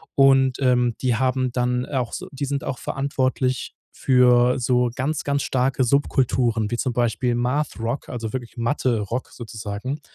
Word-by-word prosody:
Und, 135 -1 +4
ähm, 125 -3 +2
die 125 -3 +1
haben 130 0 0
dann, 125 0 0
äh, 145 - -7
auch 125 -3 -1
so - - -5
die 140 +1 -6
sind 140 0 -2
auch 125 - -3
verantwortlich 130 -2 -1 0.2
für 125 -1 +4
so 125 0 +2
ganz, 140 +4 -2
ganz 140 -1 0
starke 130 0 +1
Subkulturen, 125 -4 +1
wie 120 - -1
zum 130 - -1
Beispiel 120 +1 0
„Math-Rock“, 125 0 -2
also 115 -2 -5
wirklich 125 -2 -6
Mathe-Rock 120 -2 -1
sozusagen. 115 +4 -6
125 Hz, 155 wpm, -23 LUFS, 120-135 Hz, 0.2 s, Und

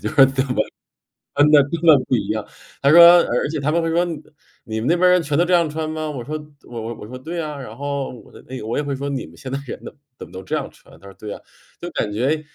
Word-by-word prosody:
就 - - -1
是 - - -9
特 135 0 -1
么 - - +2 0.7
穿 145 +1 +5
得 150 -2 +8
根 160 +4 -4
本 155 -5 +6
不 130 - +1
一 100 -3 -2
样。 110 -1 -2 0.4
他 140 - +4
说 170 - +8 0.2
而 - - 0 0.2
而 - - -2
且 155 -1 -3
他 140 +2 0
们 170 +1 +1
会 165 - -1
说： 170 +2 +2
“你 165 -3 -5 0.5
你 110 0 -4
们 120 - -3
那 170 - +4
边 180 +1 +4
人 180 0 +4
全 150 -2 -1
都 170 - +4
这 180 - 0
样 170 -2 +3
穿 155 +1 -4
吗？” 155 -1 -4
我 125 -4 -6
说 155 +4 -5 0.3
我 120 -2 -6
我 115 +1 -5
我 105 - -9
说： 130 +3 -8
“对 165 +6 -5
啊”， 150 -2 -6
然 - - -9
后， 140 -1 -3
我 125 - -14
的 - - -14
那 130 - -7
个 105 - -8
我 115 - -2
也 150 - 0
会 140 -1 -3
说： 140 +1 -4
“你 135 -3 -3
们 80 - -16
现 130 - -8
在 135 - -2
人 - - -7
都 - - -8 0.3
怎 - - -8
么 - - -20
都 95 - -7
这 - - -3
样 - - -3
穿？” - - -19
他 100 - -13
说： 100 - -12
“对 105 -1 -6
啊”。 - - -11 0.4
就 175 - -5
感 105 - -2
觉 135 +8 0
140 Hz, 330 characters per minute, -21 LUFS, 125-160 Hz, 0.7 s, 得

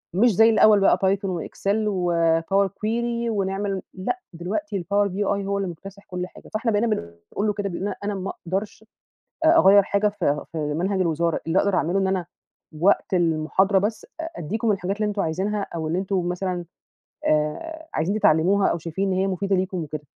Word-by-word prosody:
مش 220 +1 +4
زي 225 +2 +6
الأوّل 215 -1 +6
بقى 195 - +4
Python 195 +1 +1
وExel 200 +4 -2
وpower 175 +1 +2
query 235 +4 -2
ونعمل 195 -2 -1
لأ 195 - -3
دلوقتي 200 +4 -3
الpower 200 +3 +2
BI 205 +2 -1
هو 200 0 -1
اللي 195 -2 -2
مكتسح 195 +4 -11
كل 180 -2 -4
حاجة، - - -15
فإحنا 225 +2 0
بقينا 215 +2 +2
بنقول 85 - -3
له 210 - +1
كده 200 -1 -3
أنا 205 0 -2
ما 195 0 -4 0.2
أقدرش 200 +4 -3 0.6
أغير 205 - +7
حاجة 200 +2 +1
في 175 -8 -1
في 165 - -4
منهج 170 +6 -1
الوزارة، 170 -1 0
اللي 165 +3 +2
أقدر 200 -1 +2
أعمله 180 +3 +1
إن 195 - +1
أنا 190 -3 -1 0.5
وقت 190 +1 +3
المحاضرة 175 +3 +2
بس 210 +3 -2
أديكم 225 - -2
الحاجات 195 +1 -2
اللي 210 0 0
أنتم 205 -1 -1
عايزينها 195 +5 -1
أو 160 -1 -3
اللي 170 +3 0
أنتم 190 -2 -1
مثلًا، 180 0 -2 0.6
آآ، 320 - -1
عايزين 185 +7 0
تتعلموها 190 +3 +4
أو 170 - 0
شايفين 185 +4 -2
إن 185 - 0
هي 190 - +2
مفيدة 195 +1 0
ليكم 185 0 -1
وكده، 150 0 -7
195 Hz, 175 wpm, -24 LUFS, 175-205 Hz, 0.6 s, أغير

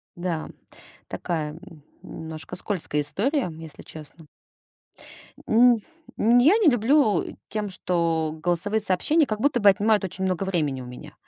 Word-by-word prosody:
Да. 175 -2 -3 0.6
Такая, 155 -4 -3
н 165 -2 -14 0.2
немножко 160 +2 -8
скользкая 180 -6 -3
история, 230 - -1
если 160 -2 -11
честно. 155 +1 -12 1.2
М 235 0 +5 0.4
м, 235 +3 +5
я 315 - +5
не 430 -6 +3
люблю 245 - +2
тем, 210 -1 -3
что 170 -4 -1
голосовые 180 +5 0
сообщения 220 - +1
как 215 -1 -3
будто 275 0 +2
бы 205 -2 +6
отнимают 210 +2 +2
очень 190 0 -4
много 185 0 -1
времени 150 -8 -1
у - - -8
меня. 125 0 -11
185 Hz, 140 wpm, -24 LUFS, 160-220 Hz, 1.2 s, бы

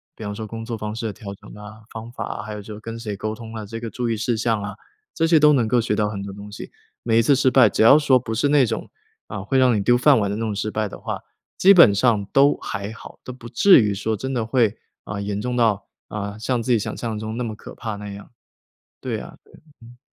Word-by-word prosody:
比 - - -9
方 105 0 -4
说 110 +1 -5
工 115 +1 -7
作 115 -1 -4
方 105 0 -5
式 115 - -5
的 110 - -3
调 100 -2 -8
整 - - -16
啊、 105 +1 -12
方 115 +1 -8
法 - - -5
啊， 100 - -5
还 110 - -7
有 105 - -6
就 105 +1 -9
是 105 - -9
跟 115 +1 -7
谁 105 -3 -5
沟 110 +2 -4
通 115 0 -10
啊， 110 -1 -5
这 115 +3 -7
个 115 0 -5
注 120 +1 -3
意 115 - -1
事 115 +2 0
项 110 -1 0
啊， 100 0 -6 0.4
这 165 - +1
些 165 -1 +5
都 150 0 +6
能 125 -5 +2
够 120 +3 +2
学 110 -2 0
到 105 0 0
很 100 -1 -5
多 100 - -6
东 100 +1 -10
西。 105 - -9 0.3
每 115 -1 +2
一 - - +6
次 130 +5 +4
失 130 0 +3
败， 115 - +6
只 - - -1
要 115 +6 +8
说 140 -4 +4
不 115 -2 -5
是 120 +6 +1
那 145 -3 +5
种， - - -4 0.4
啊， - - -6
会 135 - -1
让 130 -2 +5
你 - - 0
丢 120 +4 +4
饭 135 0 +5
碗 100 -2 0
的 100 - -2
那 110 - -4
种 110 - -2
失 100 +1 -2
败 110 -1 -2
的 - - -10
话， - - -5 0.4
基 195 +2 +7
本 170 - +7
上， 105 -2 +2
都 140 +1 +5
还 100 -1 -5
好， 115 - -12
都 - - -7
不 125 -2 -11
至 185 +11 +6
于 105 -2 0
说 110 +2 -2
真 130 +5 -4
的 120 -3 -1
会， 115 -2 +1 0.3
啊， 100 0 -5
严 100 0 -3
重 125 +3 -3
到， 110 -4 +1 0.2
啊， 100 0 -5
像 120 +2 -1
自 125 +2 +1
己 - - +4
想 105 - -4
象 115 -2 -4
中 110 +2 -5
那 125 - -2
么 110 -2 -5
可 - - -11
怕 110 -3 -5
那 105 0 -8
样。 100 +1 -10 0.7
对 - - -3
啊 - - -11
对 - - -25
啊， - - -16 0.2
嗯。 120 +1 -15
110 Hz, 305 characters per minute, -22 LUFS, 105-120 Hz, 0.7 s, 要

